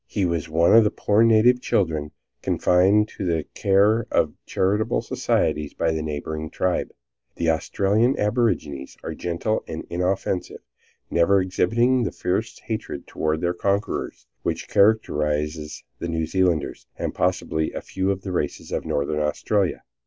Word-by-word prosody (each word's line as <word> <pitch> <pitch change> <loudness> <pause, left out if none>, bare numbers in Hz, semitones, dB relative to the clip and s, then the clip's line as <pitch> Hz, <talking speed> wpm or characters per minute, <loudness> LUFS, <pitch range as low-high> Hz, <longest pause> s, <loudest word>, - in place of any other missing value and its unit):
He 100 -3 -1
was 85 -2 -2
one 85 +5 +4
of 115 - +8
the 105 - +3
poor 105 +1 +1
native 115 +2 +5
children 80 -10 0 0.3
confided 95 +4 +3
to - - -7
the 85 -4 0
care 100 +3 +3
of - - +1
charitable 95 - 0
societies 75 -1 -1
by 85 -1 +1
the 80 0 -2
neighboring 80 +1 -4
tribes. 90 +2 -1 0.5
The 85 -1 +1
Australian 100 +9 +1
aborigines 100 - -1
are - - -4
gentle 90 +6 -2
and 80 0 -6
inoffensive, 90 +1 -2 0.5
never 95 +4 +4
exhibiting 115 +7 +2
the 115 - -1
fierce 105 +5 -2
hatred 110 -1 -5
toward 80 0 -2
their 85 0 +1
conquerors 100 +3 -2 0.2
which - - -3
characterizes 75 -7 +1 0.2
the - - -3
New 80 -1 -1
Zealanders, 90 -2 0
and - - -3
possibly 80 0 0
a - - -5
few 95 0 -2
of 95 -1 -2
the 95 - -4
races 80 -5 -3
of - - -2
Northern 75 +2 -1
Australia. 90 +6 0
90 Hz, 145 wpm, -23 LUFS, 80-105 Hz, 0.5 s, of